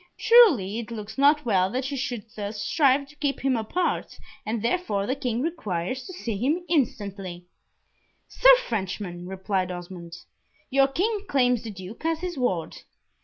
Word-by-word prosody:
Truly 315 - +5
it 235 -1 -6
looks 215 -2 -7
not 290 +1 +4
well 190 -5 +2
that 260 +5 -3
you - - -2
should 250 -5 -3
thus 205 0 -5
strive 280 +3 +2
to 300 - -17
keep 285 -2 -1
him 270 -1 +2
apart, 240 +11 -2 0.3
and 225 +1 -1
therefore 230 - 0
the 255 - 0
King 250 -3 -2
requires 255 - -3
to 370 - -8
see 235 - -4
him 300 - 0
instantly." 200 - -2 0.8
"Sir - - +6
Frenchman," 185 -4 -4
replied 190 0 -2
Osmond, 175 -1 -8 0.5
"your 270 +1 +5
King 405 +8 -1
claims 250 -7 +2
the 230 - -7
Duke 190 +4 -9
as 325 0 0
his 360 -1 -3
ward. 190 - -1
240 Hz, 160 wpm, -25 LUFS, 195-290 Hz, 0.8 s, Sir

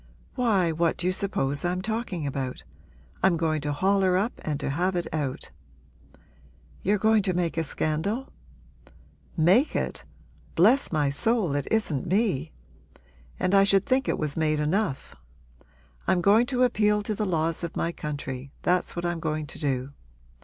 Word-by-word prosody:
'Why, 205 -9 +2
what 165 +1 0
do 175 - -4
you 185 - +2
suppose 145 -8 0
I'm 180 +1 0
talking 220 -7 -2
about? 130 - -4 0.6
I'm 185 -3 +3
going 160 -2 0
to 145 0 -2
haul 195 +7 +2
her 185 -1 +3
up 210 +6 0
and 150 -2 -2
to 140 - -2
have 180 +5 0
it 175 - -1
out.' 145 -4 -3 1.3
'You're 205 +3 +2
going 220 +1 +3
to 185 -2 -1
make 175 -2 0
a 165 - 0
scandal?' 160 - -1 1.1
'Make 185 - +4
it? - - -2 0.5
Bless 230 +11 +4
my 150 -4 +1
soul, 210 +1 +1
it 145 -1 -2
isn't 165 -11 0
me! 180 - 0 0.9
And 185 - 0
I 195 0 +7
should 195 -1 +3
think 265 -1 +1
it - - 0
was 150 -2 -2
made 155 -1 +1
enough. 155 0 -1 0.9
I'm 185 - +3
going 215 +6 +4
to 255 -1 +1
appeal 210 -4 +2
to 215 - -2
the 210 0 -2
laws 165 -1 0
of 170 - -4
my 170 - 0
country 140 -4 -6
that's 180 +1 +1
what 175 0 -3
I'm 175 -1 -1
going 155 -1 -2
to - - -10
do. 135 -1 -2
175 Hz, 165 wpm, -26 LUFS, 150-205 Hz, 1.3 s, I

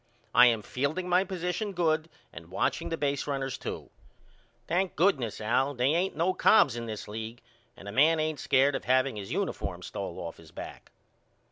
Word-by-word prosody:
I 125 +1 +8
am 115 -3 +2
fielding 145 - -2
my 180 +1 +4
position 190 +2 -3
good 160 -2 +1 0.2
and - - -11
watching - - -1
the 165 - -2
baserunners 140 -2 -2
to. - - -6 0.7
Thank 180 +5 0
goodness 145 - +1
Al 125 +6 +1
they 125 +2 +2
ain't 180 +3 0
no 175 +3 +2
Cobbs 145 - +5
in 120 -1 -5
this 110 -2 -6
league 110 +2 -6 0.4
and 100 - -11
a - - -5
man 155 +7 +4
ain't 155 -1 -1
scared 135 +2 +3
of - - -4
haveing 130 -2 +2
his 100 -2 -6
uniform - - -3
stole - - -5
off 85 -1 -6
his 80 -1 -15
back. - - -9
140 Hz, 175 wpm, -29 LUFS, 120-170 Hz, 0.7 s, I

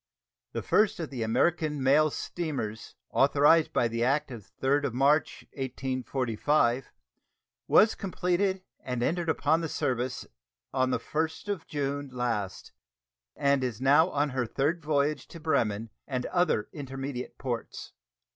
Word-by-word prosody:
The - - -3
first 215 -1 +2
of 160 -4 -4
the 125 -3 -5
American 150 +5 +1
mail 150 +4 +5
steamers 135 -10 -4 0.2
authorized 145 +4 +4
by 120 - +2
the 115 0 -1
act 145 +3 +1
of 115 -5 -9
the 130 - -2
3d 145 +2 +3
of 130 - -2
March, 145 +4 +2
1845, 130 0 -1 0.8
was 215 - +6
completed 185 0 -1 0.2
and 125 -2 -3
entered 170 +4 0
upon 160 +1 +2
the 165 - -3
service 125 -1 -2 0.5
on 130 -1 +2
the - - +1
1st 160 +5 -3
of 195 -5 -3
June 145 -2 -3
last, 115 -6 -3 0.6
and 140 -1 +2
is 120 -4 -2
now 145 +6 +5
on 145 -2 0
her 125 -2 -1
third 150 +9 0
voyage 150 -1 0
to 170 - -11
Bremen 115 -9 0 0.2
and 125 -2 -2
other 175 - +1
intermediate 135 -2 -6
ports. 120 -4 -5
140 Hz, 140 wpm, -28 LUFS, 125-155 Hz, 0.8 s, was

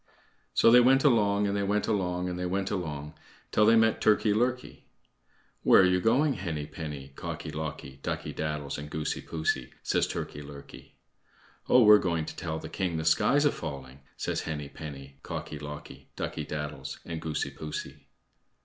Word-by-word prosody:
So 115 - +6
they 125 - +9
went 130 +2 +5
along, 105 -7 +3
and 100 0 0
they 100 - 0
went 100 +1 0
along, 90 -4 0
and 90 0 -4
they 90 - -2
went 95 +2 -1
along 75 -6 -4 0.4
till 105 - +4
they 115 - +7
met 110 0 +3
Turkey 105 0 +4
lurkey. 125 +3 -1 0.8
"Where - - +7
are - - +6
you 90 0 +3
going, 135 +7 +3
Henny 85 - -4
penny, 75 -4 -7
Cocky - - -5
locky, 75 -3 -6
Ducky - - -3
daddles, 75 -2 -3
and 75 0 -7
Goosey 75 0 -3
poosey?" 65 -5 -2
says - - +1
Turkey 75 - -5
lurkey. 70 -1 -12 0.7
"Oh! 125 - +7
we're 105 -1 +9
going 85 -3 -1
to - - -7
tell 80 -2 -3
the - - -7
king 90 -4 -2
the 80 - -3
sky's 140 - +4
a 145 - +5
falling," 70 -4 -7 0.2
says - - -2
Henny 75 -3 -4
penny, 70 -3 -9
Cocky 75 - -6
locky, 75 0 -9
Ducky - - -4
daddles, 75 -2 -5
and 80 -2 -5
Goosey 80 -2 -2
poosey. 75 -1 -7
80 Hz, 175 wpm, -29 LUFS, 75-105 Hz, 0.8 s, they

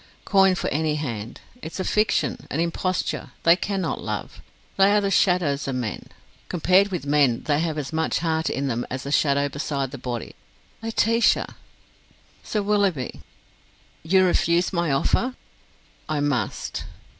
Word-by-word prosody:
Coin 195 -2 +4
for - - -2
any 155 +1 0
hand! 120 -6 -5 0.2
It's 165 +1 -7
a - - 0
fiction, 210 +3 0
an 150 - -2
imposture 170 +2 -2
they 170 +1 +7
cannot 190 0 -2
love. - - -5 0.3
They 195 +1 +5
are 210 - +5
the 200 -1 -1
shadows 170 -9 +2
of 135 - -2
men. 120 -5 -4 0.4
Compared 185 +3 +4
with 180 -7 -4
men, 140 -5 +2
they 145 -1 +1
have 160 -1 -1
as 150 0 -4
much 160 0 0
heart 160 -1 0
in 140 - -2
them 120 -2 -1
as 130 +1 -4
the 140 - -5
shadow 140 -1 +3
beside 140 -2 -3
the 135 - -7
body. 120 -2 -5 0.5
Laetitia!" 225 +1 +2 0.9
"Sir 210 -2 -2
Willoughby." 200 -10 0 0.8
"You 185 +4 +4
refuse 175 +1 +2
my 170 -2 0
offer?" 245 - +1 0.7
"I 155 -1 0
must." 145 -4 -2
160 Hz, 150 wpm, -24 LUFS, 140-190 Hz, 0.9 s, they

